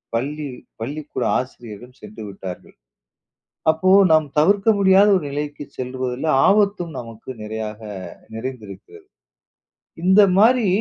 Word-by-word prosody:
பள்ளி 145 Hz, +5 st, -3 dB, 0.3 s
பள்ளிக்கூட 145 Hz, +5 st, -5 dB, 0.2 s
ஆசிரியரும் 120 Hz, -1 st, -9 dB
சென்று 105 Hz, +1 st, -10 dB
விட்டார்கள். 95 Hz, -2 st, -9 dB, 1.0 s
அப்போ 160 Hz, +4 st, 0 dB, 0.2 s
நாம் 155 Hz, -2 st, +4 dB
தவிர்க்க 195 Hz, +7 st, +3 dB
முடியாத 195 Hz, +1 st, +5 dB
ஒரு 165 Hz, -, -5 dB
நிலைக்கு 145 Hz, 0 st, -5 dB
செல்வதுல 130 Hz, +2 st, -4 dB, 0.2 s
ஆபத்தும் 200 Hz, -5 st, +2 dB
நமக்கு 115 Hz, 0 st, -11 dB
நிறையாக 110 Hz, 0 st, -6 dB, 0.5 s
நிறைந்திருக்கிறது. 125 Hz, -, -9 dB, 1.0 s
இந்த 190 Hz, +3 st, +6 dB, 0.2 s
மாரி 230 Hz, +2 st, +4 dB
145 Hz, 100 wpm, -21 LUFS, 115-190 Hz, 1.0 s, இந்த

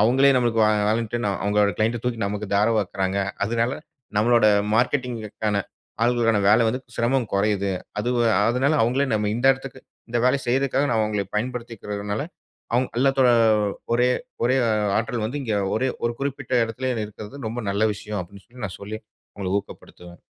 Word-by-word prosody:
அவுங்களே 130 Hz, +6 st, +5 dB
நம்மளுக்கு 120 Hz, -2 st, +2 dB
வா 105 Hz, -, +4 dB, 0.2 s
வாலன்டின் 115 Hz, +1 st, -1 dB
னா, 100 Hz, -, +1 dB
அவுங்களோட 105 Hz, -1 st, +2 dB
கிளையன்ட்‌ 115 Hz, +2 st, +1 dB
ட -, -, -12 dB
தூக்கி 115 Hz, -2 st, -2 dB
நமக்கு 105 Hz, +1 st, -4 dB
தாரவாக்கிறாங்க. 100 Hz, -2 st, +1 dB, 0.3 s
அதனால 115 Hz, +3 st, 0 dB, 0.5 s
நம்மளோட 115 Hz, +1 st, +4 dB, 0.3 s
மார்க்கெட்டிங்‌ 125 Hz, 0 st, +1 dB, 0.2 s
க்கான 105 Hz, -2 st, 0 dB, 0.4 s
ஆட்களுக்கான 115 Hz, -2 st, +3 dB
வேல 110 Hz, +3 st, +5 dB
வந்து 130 Hz, +3 st, -2 dB, 0.2 s
சிரமம் 120 Hz, -1 st, +1 dB
கொறையுது. 100 Hz, -1 st, +1 dB, 0.3 s
அது 120 Hz, -, -1 dB, 0.4 s
அதனால 135 Hz, +6 st, +2 dB
அவுங்களே 130 Hz, +5 st, +1 dB
நம்ம 105 Hz, -1 st, 0 dB
இந்த 125 Hz, +3 st, 0 dB
இடத்திற்கு 135 Hz, 0 st, -9 dB, 0.3 s
இந்த 120 Hz, 0 st, 0 dB
வேலைய 135 Hz, +2 st, +3 dB
செய்றக்காக 135 Hz, +2 st, +1 dB
நான் 115 Hz, -, +2 dB
அவுங்கள 105 Hz, -2 st, 0 dB
பயன்படுத்திக்கிறதுனால, 105 Hz, -3 st, -3 dB, 0.5 s
அவுங்க 125 Hz, +2 st, +1 dB
அல்லாத்தோட 135 Hz, -1 st, +4 dB, 0.6 s
ஒரே 125 Hz, +1 st, +3 dB, 0.4 s
ஒரே 130 Hz, +2 st, +3 dB, 0.4 s
ஆற்றல் 115 Hz, 0 st, -1 dB
வந்து, 140 Hz, +6 st, -4 dB
இங்கே 110 Hz, -4 st, -1 dB, 0.2 s
ஒரே 130 Hz, +4 st, +1 dB, 0.2 s
ஒரு 120 Hz, -, +1 dB
குறிப்பிட்ட 140 Hz, -2 st, -4 dB
இடத்திலே 125 Hz, +3 st, -3 dB, 0.2 s
இருக்கிறது, 110 Hz, +6 st, -10 dB
ரொம்ப 120 Hz, +1 st, -4 dB
நல்ல 100 Hz, +2 st, -1 dB
விஷயம் 105 Hz, 0 st, -5 dB
அப்பிடின்னு 95 Hz, +2 st, -11 dB
சொல்லி 125 Hz, -2 st, -9 dB
நான் 95 Hz, -, -9 dB
சொல்லி 105 Hz, +2 st, -6 dB, 0.4 s
அவுங்கள 95 Hz, -2 st, -4 dB
ஊக்கப்படுத்துவேன். 90 Hz, -3 st, -12 dB
115 Hz, 155 wpm, -23 LUFS, 105-125 Hz, 0.6 s, அவுங்களே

